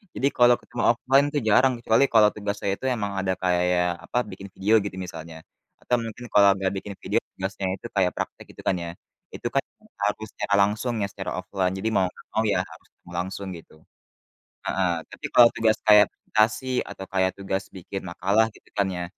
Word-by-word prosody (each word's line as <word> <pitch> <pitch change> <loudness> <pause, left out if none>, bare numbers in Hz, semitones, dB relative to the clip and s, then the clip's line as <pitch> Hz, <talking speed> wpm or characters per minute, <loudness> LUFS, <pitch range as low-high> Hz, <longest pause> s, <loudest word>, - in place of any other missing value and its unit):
Jadi 135 - +1
kalau 120 0 +7
ketemu 115 - -5
offline 135 +4 +3
tuh 145 - +1
jarang 130 +5 +5
kecuali 115 +2 +3
kalau 110 -2 +7
tugasnya 100 -1 -3
itu - - -7
emang 100 -3 -3
ada 95 -1 0
kayak 90 -1 +1
apa, - - -3
bikin 95 +1 -9
video 105 +3 +1
gitu 100 - -5
misalnya. 80 -2 -9 0.5
Atau 125 - +1
mungkin 115 +2 -7
kalau 100 -1 +7
nggak 95 -1 0
bikin 100 +1 -6
video - - +1 0.2
tugasnya 95 0 -4
itu 100 - -15
kayak 95 -2 +3
praktek - - -5
gitu - - -10
kan 95 - +3
ya. 85 - -5 0.4
Itu - - -4
kan 140 - +2 0.4
harus 105 +1 -1
secara 105 -1 -3
langsung 105 +5 +1
ya, - - 0
secara 95 -1 -5
offline. 95 +1 -1
Jadi 105 +4 -1
mau 95 -3 +3
nggak 90 - -17
mau 110 - +2
ya 90 - +2
harus 80 -3 -15
ketemu 85 - -18
langsung 95 +2 -4
gitu, 80 - -16 0.9
heeh. 95 -2 +1 0.2
Tapi - - -7
kalau 120 -1 +8
tugas 110 -1 +2
kayak 105 -1 +8
presentasi 110 +3 0 0.2
atau 95 - -7
kayak 95 -1 +2
tugas 95 0 -2
bikin 95 +2 -6
makalah 100 +5 +2
gitu - - -21
kan, 100 -1 +2
ya 90 - -3
100 Hz, 195 wpm, -25 LUFS, 95-110 Hz, 0.9 s, kalau